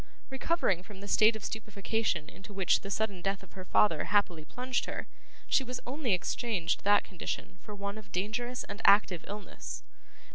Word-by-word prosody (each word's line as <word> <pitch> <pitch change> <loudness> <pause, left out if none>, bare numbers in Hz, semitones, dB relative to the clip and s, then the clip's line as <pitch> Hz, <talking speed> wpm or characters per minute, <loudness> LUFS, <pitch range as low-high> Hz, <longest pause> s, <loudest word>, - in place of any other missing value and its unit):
Recovering 265 - +1
from 200 0 -12
the 200 - -8
state 215 +2 +5
of 220 - -7
stupefaction 215 -5 -1
into 195 +2 -11
which 190 -2 +3
the 200 - -7
sudden 200 -2 -1
death 195 +1 -1
of 195 - -16
her 185 - -7
father 175 -4 +3
happily 180 -4 +2
plunged 250 +9 -2
her, - - -4 0.4
she 270 - +3 0.2
only 255 -3 0
exchanged 190 -2 -1
that 205 +1 +5
condition 185 +1 -5
for 210 - -8
one 200 +1 -4
of 200 -2 -15
dangerous 240 +6 -2
and 205 +2 -7
active 200 -4 +5
illness. 205 0 -6
205 Hz, 170 wpm, -31 LUFS, 190-220 Hz, 0.4 s, state